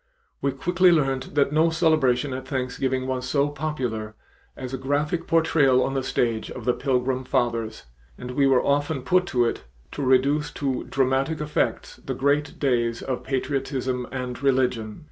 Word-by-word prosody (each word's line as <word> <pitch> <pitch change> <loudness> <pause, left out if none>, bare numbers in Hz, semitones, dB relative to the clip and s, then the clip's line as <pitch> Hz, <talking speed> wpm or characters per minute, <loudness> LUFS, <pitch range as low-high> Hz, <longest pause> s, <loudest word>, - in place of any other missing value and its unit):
We 140 - +1
quickly 180 +6 +3
learned 135 -5 0
that 140 -1 +3
no 160 +2 +3
celebration 155 -6 +2
at 130 0 -6
Thanksgiving 130 0 -2
was 130 -1 -3
so 140 +1 +2
popular 125 -8 -4 0.4
as 130 0 -6
a - - -1
graphic 145 +5 -1
portrayal 145 -6 +3
on 135 - -2
the 135 - 0
stage 115 -3 -1
of - - -8
the 125 - +3
Pilgrim 130 -1 0
Fathers, 120 -4 -1 0.3
and 125 - -7
we 135 +2 +2
were 130 -2 +3
often 145 -1 0
put 180 +7 +2
to 120 -5 +2
it 115 - -3 0.3
to - - -5
reduce 140 +3 +2
to 135 -3 -2
dramatic 135 +4 0
effects 150 0 -2
the - - -5
great 145 +2 0
days 120 -4 0
of 130 -2 -3
patriotism 130 -2 -2
and 125 -1 -5
religion. 125 -5 0
135 Hz, 165 wpm, -24 LUFS, 125-145 Hz, 0.4 s, quickly